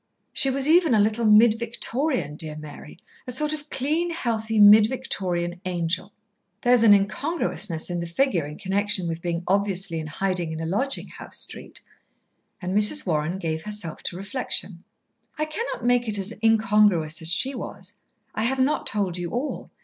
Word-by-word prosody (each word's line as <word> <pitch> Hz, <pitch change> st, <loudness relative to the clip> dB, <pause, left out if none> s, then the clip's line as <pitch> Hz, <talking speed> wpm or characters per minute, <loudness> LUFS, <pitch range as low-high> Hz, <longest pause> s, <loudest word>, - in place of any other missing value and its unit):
"She 270 Hz, -, +3 dB
was 270 Hz, +1 st, +1 dB
even 325 Hz, -5 st, +4 dB
a -, -, +3 dB
little 220 Hz, +3 st, +1 dB
Mid 215 Hz, +1 st, +5 dB
Victorian, 235 Hz, -, -2 dB
dear 155 Hz, -1 st, -3 dB
Mary; 150 Hz, 0 st, -11 dB, 0.3 s
a -, -, -4 dB
sort 300 Hz, +4 st, +1 dB
of 300 Hz, -1 st, -7 dB
clean, 310 Hz, +6 st, -1 dB
healthy, 225 Hz, -8 st, -2 dB
Mid 210 Hz, +1 st, +8 dB
Victorian 180 Hz, -9 st, -3 dB
angel." 180 Hz, +1 st, -2 dB, 0.5 s
"There's 245 Hz, -1 st, +4 dB
an 215 Hz, -3 st, +7 dB
incongruousness 195 Hz, -, -1 dB
in 175 Hz, -1 st, -3 dB
the 170 Hz, -, -4 dB
figure 175 Hz, -, 0 dB
in 150 Hz, -, -9 dB
connection 195 Hz, -1 st, +1 dB
with 165 Hz, 0 st, -4 dB
being 170 Hz, 0 st, -3 dB
obviously 195 Hz, -3 st, 0 dB
in 155 Hz, -, -6 dB
hiding 180 Hz, 0 st, -2 dB
in 160 Hz, -, -5 dB
a 165 Hz, -, -4 dB
lodging 225 Hz, +11 st, -1 dB
house -, -, -7 dB
street." -, -, -3 dB, 0.8 s
And 185 Hz, +1 st, -4 dB
Mrs. 210 Hz, +8 st, +4 dB
Warren 160 Hz, 0 st, -1 dB
gave 160 Hz, -3 st, -3 dB
herself 210 Hz, -4 st, -6 dB
to 175 Hz, -, -3 dB
reflection. 195 Hz, -4 st, -4 dB, 0.5 s
"I 305 Hz, -, 0 dB
cannot 310 Hz, -, -5 dB
make 245 Hz, -1 st, +2 dB
it 210 Hz, -1 st, +1 dB
as 200 Hz, +3 st, 0 dB
incongruous 210 Hz, -8 st, +3 dB
as 160 Hz, -, -5 dB
she 260 Hz, +10 st, +1 dB
was. 250 Hz, -, -8 dB, 0.4 s
I 220 Hz, -, -1 dB
have 265 Hz, +3 st, 0 dB
not 275 Hz, +4 st, +1 dB
told 190 Hz, -4 st, -1 dB
you 175 Hz, -1 st, -4 dB
all. 250 Hz, -, -4 dB
205 Hz, 170 wpm, -24 LUFS, 175-245 Hz, 0.8 s, Mid